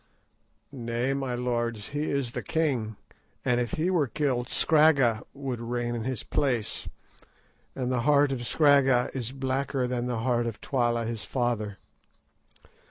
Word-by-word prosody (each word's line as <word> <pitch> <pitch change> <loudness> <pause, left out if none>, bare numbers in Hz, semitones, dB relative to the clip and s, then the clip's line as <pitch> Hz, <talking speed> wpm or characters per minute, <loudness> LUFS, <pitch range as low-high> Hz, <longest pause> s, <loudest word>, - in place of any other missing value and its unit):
"Nay, 120 0 -2
my 135 -2 -2
lords, 120 -3 -2
he 145 +2 -2
is 140 -4 -1
the - - -4
king, 130 -10 -1 0.5
and 125 0 +2
if 120 - -3
he 170 +4 +1
were 160 -6 +2
killed 130 -1 -1
Scragga 140 -8 +4
would 135 -4 -4
reign 120 0 -2
in 115 -1 -3
his 130 -4 -2
place, 125 -6 0 0.9
and 130 -1 -2
the 125 -2 +1
heart 145 +2 +4
of 120 -3 -3
Scragga 140 -5 +4
is 125 -3 -3
blacker 135 0 -1
than 125 -1 -2
the 120 -3 -2
heart 120 -2 +1
of 115 - -5
Twala 120 -3 0
his 115 -2 -4
father. 115 -4 -1
125 Hz, 150 wpm, -27 LUFS, 120-135 Hz, 0.9 s, Scragga